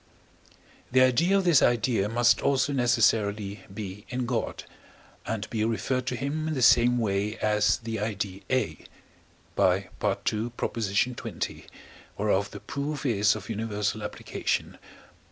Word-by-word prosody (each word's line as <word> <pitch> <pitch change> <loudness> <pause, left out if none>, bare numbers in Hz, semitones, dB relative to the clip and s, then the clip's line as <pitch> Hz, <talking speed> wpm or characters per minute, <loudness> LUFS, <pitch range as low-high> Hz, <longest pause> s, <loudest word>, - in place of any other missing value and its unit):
The 130 +1 +5
idea 165 +10 +4
of 195 - +1
this 170 -6 +5
idea 115 -3 +2
must 120 +1 +3
also 140 +1 +1
necessarily 105 -5 +1
be 100 0 -7
in 125 0 -2
God, 120 -2 -2 0.6
and 110 -1 -3
be 110 -2 0
referred 125 +3 -1
to 125 - -1
him 145 +5 -2
in 160 - -1
the 130 - 0
same 125 +1 +6
way 105 -1 -1
as 105 -1 +2
the 115 -1 -5
idea 100 -2 -3
A 125 -12 0 0.8
(by 90 0 +4
II. 95 -1 -10 0.9
xx., 110 +4 -2 0.5
whereof 100 -1 +1
the - - -9
proof 145 0 -4
is 105 -4 +3
of - - -8
universal 105 -1 -2
application). - - -3
115 Hz, 135 wpm, -27 LUFS, 105-125 Hz, 0.9 s, same